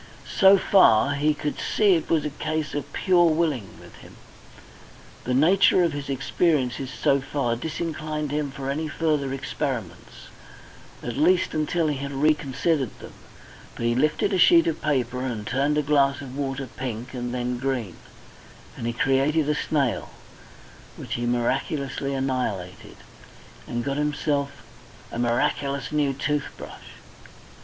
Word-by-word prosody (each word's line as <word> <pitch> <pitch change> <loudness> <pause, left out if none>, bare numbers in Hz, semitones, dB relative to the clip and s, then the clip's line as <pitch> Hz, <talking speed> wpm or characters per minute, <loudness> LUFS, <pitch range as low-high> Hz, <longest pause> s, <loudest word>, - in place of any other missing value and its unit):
So 195 0 +8
far, 140 - +4
he 150 +2 +1
could 150 0 -4
see 205 -3 +3
it 165 - -1
was 155 -3 +2
a 150 - -2
case 155 +1 -3
of 145 - -4
pure 180 -3 +3
willing 155 - -1
with - - -15
him. - - -15 1.1
The 125 - 0
nature 180 +5 +5
of 170 -3 +1
his 145 -1 -5
experiences 135 -2 0
so 140 +1 +1
far 130 -4 -1
disinclined 155 +1 -4
him 150 -1 -1
for 135 0 -7
any 155 +3 -2
further 150 -3 -1
experiments, 130 - -5 0.7
at 120 0 -4
least 175 +5 +3
until 160 +2 0
he 145 -2 -1
had 140 +1 -5
reconsidered 145 -1 0
them. - - -11 0.6
But 115 - -4
he 120 - +2
lifted 155 - +1
a 185 - +1
sheet 340 - +6
of 335 - -2
paper, 130 -4 -1
and 120 -5 -4
turned 140 +5 0
a 150 - +2
glass 140 -1 +2
of 135 -2 -8
water 135 -1 -3
pink 125 -1 -6
and 125 -1 -4
then 125 0 -2
green, 125 -9 -3 0.8
and 115 - -5
he 120 - -1
created 135 +5 +2
a 150 - +2
snail, 145 -4 -1 0.9
which - - -6
he 120 0 -2
miraculously 135 +3 -1
annihilated, 125 -9 -3 0.7
and 120 0 -3
got 140 +1 -2
himself 145 -3 -1 0.5
a - - -5
miraculous 130 +3 0
new 150 -2 +1
tooth 145 +1 -1
brush. - - -11
140 Hz, 150 wpm, -24 LUFS, 125-155 Hz, 1.1 s, So